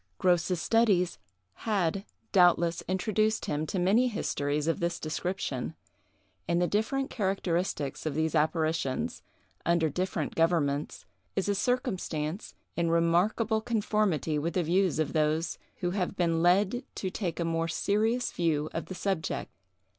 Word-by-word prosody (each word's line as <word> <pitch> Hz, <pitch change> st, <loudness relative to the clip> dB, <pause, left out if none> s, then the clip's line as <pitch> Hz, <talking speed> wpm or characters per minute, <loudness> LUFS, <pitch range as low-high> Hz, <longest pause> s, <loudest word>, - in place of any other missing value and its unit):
Grose's 180 Hz, 0 st, +2 dB
studies 200 Hz, -5 st, +2 dB, 0.5 s
had, 195 Hz, -1 st, +1 dB, 0.3 s
doubtless, 175 Hz, -3 st, +4 dB
introduced 215 Hz, +3 st, +1 dB
him 150 Hz, +1 st, -2 dB
to 190 Hz, -, -3 dB
many 200 Hz, +8 st, +4 dB
histories 150 Hz, -10 st, -1 dB
of 165 Hz, -, +1 dB
this 170 Hz, 0 st, -1 dB
description; 155 Hz, -4 st, -3 dB, 0.7 s
and 170 Hz, +1 st, +2 dB
the 180 Hz, -, +3 dB
different 220 Hz, +8 st, 0 dB
characteristics 185 Hz, -, -1 dB
of 145 Hz, -, -2 dB
these 160 Hz, 0 st, 0 dB
apparitions, 155 Hz, -3 st, 0 dB, 0.4 s
under 170 Hz, -2 st, +2 dB
different 180 Hz, -2 st, -2 dB
governments, 155 Hz, -4 st, 0 dB, 0.3 s
is 195 Hz, -, 0 dB
a 205 Hz, -, +2 dB
circumstance 190 Hz, -, -2 dB, 0.2 s
in 170 Hz, -1 st, +1 dB
remarkable 180 Hz, +7 st, +2 dB
conformity 210 Hz, -, 0 dB
with 165 Hz, +3 st, -2 dB
the 180 Hz, -, +2 dB
views 180 Hz, +2 st, +2 dB
of 155 Hz, -2 st, 0 dB
those 155 Hz, +1 st, +1 dB, 0.2 s
who 175 Hz, -1 st, 0 dB
have 185 Hz, 0 st, -1 dB
been 165 Hz, -3 st, +1 dB
led 195 Hz, +8 st, +3 dB
to 190 Hz, -, -3 dB
take 180 Hz, -4 st, -3 dB
a 170 Hz, -, 0 dB
much 165 Hz, -, -1 dB
more 165 Hz, 0 st, 0 dB
serious 220 Hz, +8 st, +1 dB
view 155 Hz, -3 st, 0 dB
of 165 Hz, -, -4 dB
the 185 Hz, -, -6 dB
subject. 190 Hz, -4 st, -2 dB
175 Hz, 140 wpm, -29 LUFS, 160-200 Hz, 0.7 s, doubtless